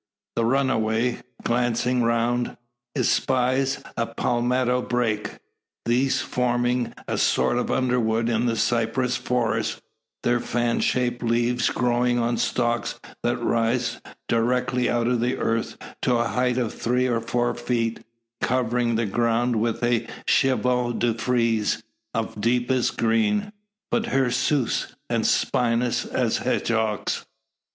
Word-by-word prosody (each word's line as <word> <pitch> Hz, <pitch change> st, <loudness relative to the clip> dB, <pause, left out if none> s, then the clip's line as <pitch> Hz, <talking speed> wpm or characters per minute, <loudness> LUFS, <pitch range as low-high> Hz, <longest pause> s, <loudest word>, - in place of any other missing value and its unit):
The 115 Hz, -, +1 dB
runaway, 120 Hz, -2 st, +1 dB, 0.2 s
glancing 120 Hz, +1 st, +1 dB
around, 120 Hz, +1 st, 0 dB, 0.4 s
espies 130 Hz, +1 st, +1 dB
a 115 Hz, -1 st, -1 dB
palmetto 125 Hz, +1 st, +1 dB
brake; 115 Hz, -4 st, -1 dB, 0.5 s
these 125 Hz, +3 st, +2 dB
forming 120 Hz, -1 st, 0 dB
a -, -, -1 dB
sort 120 Hz, -, +2 dB
of -, -, -2 dB
underwood 115 Hz, -3 st, +1 dB
in 120 Hz, +1 st, +1 dB
the 115 Hz, -, +1 dB
cypress 120 Hz, +2 st, +1 dB
forest, 115 Hz, -3 st, -1 dB, 0.4 s
their 120 Hz, 0 st, +2 dB
fan 120 Hz, 0 st, 0 dB
shaped 125 Hz, -1 st, 0 dB
leaves 120 Hz, +1 st, +1 dB
growing 120 Hz, 0 st, +1 dB
on 120 Hz, 0 st, 0 dB
stalks 120 Hz, -1 st, 0 dB, 0.2 s
that 120 Hz, +1 st, 0 dB
rise 120 Hz, +1 st, 0 dB, 0.3 s
directly 125 Hz, +1 st, +1 dB
out 120 Hz, -1 st, +1 dB
of 125 Hz, 0 st, +1 dB
the 120 Hz, +2 st, 0 dB
earth 115 Hz, 0 st, -1 dB, 0.2 s
to 125 Hz, -, +2 dB
a 120 Hz, 0 st, +1 dB
height 125 Hz, 0 st, +1 dB
of 120 Hz, -4 st, -1 dB
three 125 Hz, +2 st, 0 dB
or 120 Hz, -2 st, +1 dB
four 120 Hz, +1 st, 0 dB
feet, 120 Hz, -1 st, -2 dB, 0.4 s
covering 120 Hz, -1 st, +1 dB
the 115 Hz, +1 st, +1 dB
ground 120 Hz, +3 st, +1 dB
with 115 Hz, +2 st, -1 dB
a 120 Hz, -1 st, +1 dB, 0.2 s
chevaux 125 Hz, -2 st, +2 dB
de 120 Hz, 0 st, +1 dB
frise 115 Hz, -2 st, 0 dB, 0.3 s
of 110 Hz, -2 st, -3 dB
deepest 125 Hz, +2 st, +1 dB
green, 115 Hz, -, +1 dB, 0.4 s
but 230 Hz, -, +1 dB
hirsute 135 Hz, -, 0 dB, 0.2 s
and -, -, +1 dB
spinous 120 Hz, 0 st, +1 dB
as -, -, 0 dB
hedgehogs. 110 Hz, -2 st, 0 dB
120 Hz, 125 wpm, -24 LUFS, 115-125 Hz, 0.5 s, these